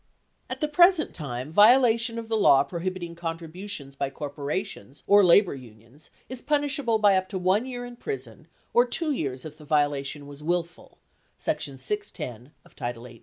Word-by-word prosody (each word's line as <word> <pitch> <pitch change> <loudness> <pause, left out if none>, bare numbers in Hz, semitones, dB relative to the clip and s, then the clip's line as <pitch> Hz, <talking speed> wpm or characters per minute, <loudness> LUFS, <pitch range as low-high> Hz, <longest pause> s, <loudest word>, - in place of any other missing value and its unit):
At - - -6
the 305 - +1
present 345 +2 +4
time, 135 -2 -5
violation 230 +3 +5
of 230 -1 -5
the 225 - 0
law 140 -10 +5
prohibiting 175 +2 -5
contributions 165 -2 -6
by 140 0 -2
corporations 145 - -5
or 205 0 +6
labor 180 +2 +5
unions 120 +2 -14 0.2
is 255 -1 -6
punishable 285 -5 +1
by 205 -2 +4
up 185 0 0
to 195 - -3
1 190 +6 +1
year 245 -1 -5
in 245 0 -10
prison 130 - -6 0.3
or 240 +1 +5
2 315 +5 -1
years 135 - -3
if 155 0 -10
the - - -12
violation 145 -1 0
was 145 0 -11
"willful" 175 +2 -3 0.4
(section - - -2
610 150 - -5
of - - -21
title 120 0 -5
18). 120 -2 -13
170 Hz, 170 wpm, -26 LUFS, 140-230 Hz, 0.4 s, or